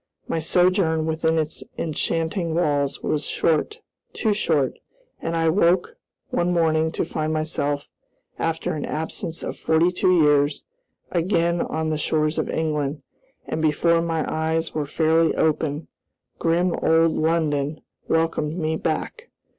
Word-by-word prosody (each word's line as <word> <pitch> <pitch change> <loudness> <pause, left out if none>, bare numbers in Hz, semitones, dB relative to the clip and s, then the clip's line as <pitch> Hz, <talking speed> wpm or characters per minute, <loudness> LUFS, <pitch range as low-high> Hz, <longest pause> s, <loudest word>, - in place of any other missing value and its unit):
My 165 - -1
sojourn 170 -1 +2
within 160 0 0
its 155 0 -2
enchanting 165 +1 -1
walls 145 -5 0
was 150 -1 0
short, 425 - 0 0.3
too 215 -2 +1
short, 155 -9 0 0.4
and 165 - -2
I 165 0 +1
woke 175 +1 +2 0.4
one 175 +1 +1
morning 160 -2 +2
to - - -1
find 155 0 -2
myself, 150 -2 -1 0.5
after 165 0 -1
an 150 - -3
absence 160 +1 -3
of - - -5
forty 160 +2 +3
two 180 0 +3
years, 145 -1 +2 0.5
again 170 -1 +1
on 160 0 -2
the 155 - -1
shores 155 0 0
of - - -2
England, 150 -2 -2 0.4
and 160 - -3
before 165 +2 +3
my 165 -1 -1
eyes 160 +1 -1
were 150 -2 -2
fairly 160 +2 +2
open, 155 -1 0 0.5
grim 170 +2 +2
old 165 0 +4
London 155 -2 0 0.3
welcomed 160 -1 0
me 160 -2 -1
back. 470 - -3
160 Hz, 135 wpm, -23 LUFS, 155-170 Hz, 0.5 s, old